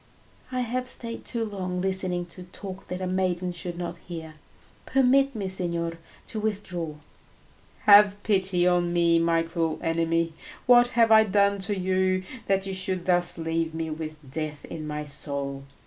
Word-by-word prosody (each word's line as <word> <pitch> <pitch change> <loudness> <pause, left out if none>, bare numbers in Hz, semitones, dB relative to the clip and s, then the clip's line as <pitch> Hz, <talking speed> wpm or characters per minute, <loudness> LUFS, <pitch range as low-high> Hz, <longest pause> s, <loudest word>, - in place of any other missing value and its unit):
"I 255 0 -1
have 250 +1 -2
stayed 230 -2 -3
too 230 -2 -2
long 185 -4 -4
listening 185 -1 -1
to 185 - -10
talk 185 +1 -8
that 180 +1 -5
a - - -1
maiden 185 -1 -1
should 175 0 -5
not 175 -1 -4
hear; 165 -3 -8 0.5
permit 270 +1 +3
me, 200 -3 -3
signor, 170 -3 -1 0.3
to 220 - -5
withdraw." 185 -7 -3 0.9
"Have 205 0 +7
pity 190 -3 +1
on 175 -1 +2
me, 170 -1 +4
my 165 0 +2
cruel 165 -1 -2
enemy! 165 0 0 0.3
What 245 0 +7
have 230 -1 +5
I 220 0 +8
done 200 0 +2
to 205 - 0
you 185 0 +1 0.2
that 195 0 +2
you 195 - -3
should 185 -1 +1
thus 175 -1 +3
leave 165 0 -2
me 160 -1 -3
with 155 0 -5
death 155 0 -4
in 155 -1 -7
my 150 0 -4
soul? 140 -1 -4
180 Hz, 165 wpm, -26 LUFS, 165-200 Hz, 0.9 s, I